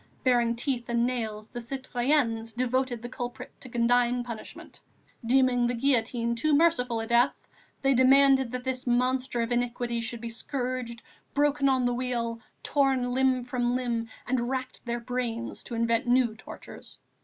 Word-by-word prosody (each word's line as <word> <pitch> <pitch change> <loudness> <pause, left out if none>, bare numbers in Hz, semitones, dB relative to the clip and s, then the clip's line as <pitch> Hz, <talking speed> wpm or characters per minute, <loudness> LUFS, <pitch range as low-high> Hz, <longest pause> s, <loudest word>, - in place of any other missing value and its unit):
Baring 240 -2 +3
teeth 240 -1 -2
and 235 0 +2
nails, 220 -4 -3
the 240 - -6
citoyennes 240 -2 -1
devoted 250 0 -1
the - - -4
culprit 245 +1 -6
to 260 - -10
condign 245 +1 +2
punishment; 235 -3 -9 0.4
deeming 245 0 +3
the 245 - -1
guillotine 235 -2 +1
too 290 +6 +2
merciful 270 -7 +2
a 225 - -3
death, 240 +4 +3 0.5
they 270 0 +4
demanded 265 0 +5
this 255 +1 -4
monster 250 0 +1
of 230 - -4
iniquity 240 -1 -1
should 230 +1 -4
be 235 - -6
scourged, 245 -1 -4 0.3
broken 285 -1 +3
on 260 -2 +2
the 245 - +1
wheel, 240 -2 -2 0.2
torn 265 -3 +1
limb 260 -1 +2
from 245 0 -1
limb, 235 -2 -2 0.2
and 245 -1 0
racked 260 -1 -4
their 235 0 -1
brains 235 -1 -3
to 235 - -5
invent 230 +2 +1
new 245 -2 +3
tortures. - - -11
245 Hz, 155 wpm, -28 LUFS, 235-260 Hz, 0.5 s, demanded